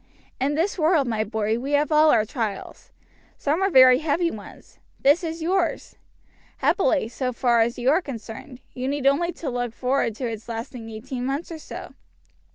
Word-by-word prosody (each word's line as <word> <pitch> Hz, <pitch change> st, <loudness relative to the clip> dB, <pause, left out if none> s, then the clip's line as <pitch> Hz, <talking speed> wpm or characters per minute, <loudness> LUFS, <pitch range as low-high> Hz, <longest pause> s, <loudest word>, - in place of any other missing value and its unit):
In 280 Hz, +3 st, 0 dB
this 355 Hz, +5 st, -1 dB
world, 310 Hz, -4 st, +3 dB
my 220 Hz, -2 st, 0 dB
boy, 220 Hz, +1 st, -1 dB
we 275 Hz, +4 st, -4 dB
have 295 Hz, +2 st, +2 dB
all 305 Hz, +1 st, +5 dB
our 220 Hz, -6 st, +4 dB
trials. 220 Hz, -5 st, -5 dB, 0.5 s
Some 305 Hz, +5 st, 0 dB
are 390 Hz, -, +3 dB
very 255 Hz, -5 st, +7 dB
heavy 330 Hz, +3 st, 0 dB
ones. 210 Hz, -, -12 dB, 0.2 s
This 290 Hz, +6 st, +4 dB
is 325 Hz, 0 st, -4 dB
yours. 350 Hz, 0 st, -1 dB, 0.6 s
Happily, 320 Hz, -, +2 dB
so 255 Hz, +2 st, -3 dB
far 240 Hz, -1 st, +2 dB
as 235 Hz, +1 st, 0 dB
you 245 Hz, +2 st, +2 dB
are 325 Hz, +5 st, +3 dB
concerned, 250 Hz, -, -9 dB
you 255 Hz, +1 st, -4 dB
need 280 Hz, 0 st, -2 dB
only 330 Hz, +6 st, +3 dB
look 245 Hz, -4 st, -3 dB
forward 250 Hz, -3 st, 0 dB
to 255 Hz, -, -4 dB
its 230 Hz, 0 st, -6 dB
lasting 230 Hz, 0 st, -6 dB
eighteen 245 Hz, +3 st, -6 dB
months 275 Hz, +7 st, -3 dB
or 325 Hz, -, -6 dB
so. -, -, -9 dB
265 Hz, 175 wpm, -24 LUFS, 235-310 Hz, 0.6 s, very